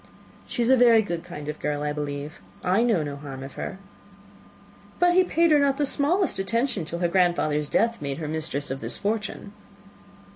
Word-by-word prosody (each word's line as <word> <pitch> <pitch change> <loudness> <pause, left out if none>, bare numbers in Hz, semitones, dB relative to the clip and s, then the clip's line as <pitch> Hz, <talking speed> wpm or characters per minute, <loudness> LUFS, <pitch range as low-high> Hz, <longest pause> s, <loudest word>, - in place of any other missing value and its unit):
"She 240 - -2
is 235 - +3
a - - +7
very 235 -3 +5
good 170 -4 -4
kind 160 -5 -9
of 150 0 -5
girl, 150 0 -2
I 150 0 -1
believe. 145 +1 -5 0.2
I 185 +5 +2
know 225 -9 +2
no 145 -1 -5
harm 135 -2 -8
of 135 - -9
her." 190 - -6 1.2
"But 355 0 +3
he 370 +1 +5
paid 335 -2 +2
her 300 - +6
not 280 -1 +2
the 295 - +1
smallest 310 - +3
attention 230 - 0
till 170 - -5
her 175 0 +1
grandfather's 170 -4 +1
death 230 +1 +1
made 140 -1 -3
her 160 -2 -5
mistress 155 -2 -3
of 135 - -4
this - - -2
fortune?" 205 -1 -3
180 Hz, 195 wpm, -25 LUFS, 150-240 Hz, 1.2 s, a